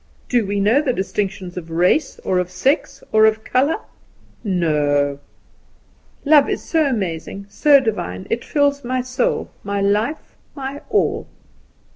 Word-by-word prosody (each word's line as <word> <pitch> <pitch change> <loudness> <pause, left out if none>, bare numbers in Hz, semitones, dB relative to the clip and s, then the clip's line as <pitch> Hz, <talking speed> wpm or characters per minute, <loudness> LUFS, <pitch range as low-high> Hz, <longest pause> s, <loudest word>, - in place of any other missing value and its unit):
Do 240 -5 +2
we 200 0 -1
know 220 +8 +3
distinctions 195 - -3
of 165 -2 -6
race, 180 - +1
or 185 - +1
of 180 0 -2
sex, 275 +5 -1
or 220 0 +5
of 220 0 0
colour? 270 +5 +2 0.7
No! 145 -7 +1 1.1
"'Love 290 -1 +5
so 320 -3 0
amazing, 195 -4 -3
so 285 +6 +5
divine, 145 - -3
It 235 - -1
fills 285 -1 +1
my 255 +1 -1
soul, 255 +1 -1
my 200 0 -2
life, 210 +9 -1 0.2
my 275 0 -6
all. - - +1
220 Hz, 130 wpm, -20 LUFS, 185-275 Hz, 1.1 s, or